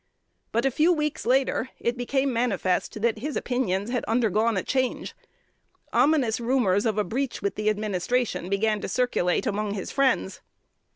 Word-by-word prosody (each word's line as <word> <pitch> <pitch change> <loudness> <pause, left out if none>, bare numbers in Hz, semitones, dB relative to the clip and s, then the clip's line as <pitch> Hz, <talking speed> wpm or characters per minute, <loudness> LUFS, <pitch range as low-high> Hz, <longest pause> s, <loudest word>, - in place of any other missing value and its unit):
But 230 +4 0
a 270 - +3
few 310 +7 +3
weeks 300 -6 -1
later 260 -1 +2
it 235 - -1
became 265 +2 0
manifest 215 -3 -1
that 230 -2 +1
his 295 +5 -4
opinions 230 -4 -1
had 250 - -1
undergone 225 -1 +1
a 185 - -1
change. 260 -2 -1 0.8
Ominous 275 -8 +3
rumors 235 -4 +2
of 215 -2 -1
a 210 - +2
breach 255 +2 -3
with 200 - 0
the 215 0 0
administration 210 0 -1
began 210 +1 +1
to - - -4
circulate 195 -8 +1
among 205 0 -1
his 195 - -5
friends. 275 -1 +1
230 Hz, 160 wpm, -25 LUFS, 210-260 Hz, 0.8 s, a